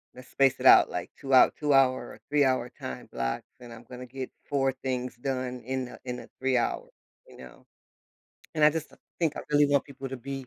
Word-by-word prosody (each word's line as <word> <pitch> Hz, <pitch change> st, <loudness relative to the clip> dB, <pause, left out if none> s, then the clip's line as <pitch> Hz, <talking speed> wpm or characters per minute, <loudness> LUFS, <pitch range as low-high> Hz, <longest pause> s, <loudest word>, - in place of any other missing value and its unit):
let's 125 Hz, 0 st, -13 dB
space 135 Hz, -2 st, +3 dB
it -, -, -5 dB
out, -, -, +8 dB
like, -, -, -5 dB
2 135 Hz, -, -6 dB
hou 130 Hz, -, +7 dB
two-hour 135 Hz, -3 st, +4 dB, 0.2 s
or -, -, -15 dB
three-hour 130 Hz, -4 st, +2 dB
time 65 Hz, -, -7 dB
blocks, 60 Hz, 0 st, -2 dB, 0.2 s
and 120 Hz, -1 st, -11 dB
I'm 115 Hz, +1 st, -12 dB
gonna 125 Hz, 0 st, -8 dB
get 130 Hz, +1 st, -7 dB, 0.2 s
4 135 Hz, -1 st, +1 dB
things 130 Hz, -1 st, -4 dB
done 130 Hz, -1 st, -3 dB
in 130 Hz, 0 st, -3 dB
a -, -, -12 dB
in 125 Hz, -1 st, -4 dB
a -, -, -14 dB
3 130 Hz, 0 st, +1 dB
hour, 120 Hz, -, -1 dB, 0.4 s
you -, -, -16 dB
know, 65 Hz, -1 st, -14 dB, 0.9 s
and 155 Hz, -, 0 dB
I 150 Hz, -, +8 dB
just 160 Hz, 0 st, -4 dB
th -, -, -20 dB, 0.2 s
think 160 Hz, -4 st, 0 dB
I -, -, -3 dB
really 145 Hz, 0 st, +5 dB
want 140 Hz, -1 st, +2 dB
people 135 Hz, -1 st, -8 dB
to 135 Hz, -, -5 dB
be 135 Hz, +1 st, -7 dB
130 Hz, 220 wpm, -28 LUFS, 125-140 Hz, 0.9 s, out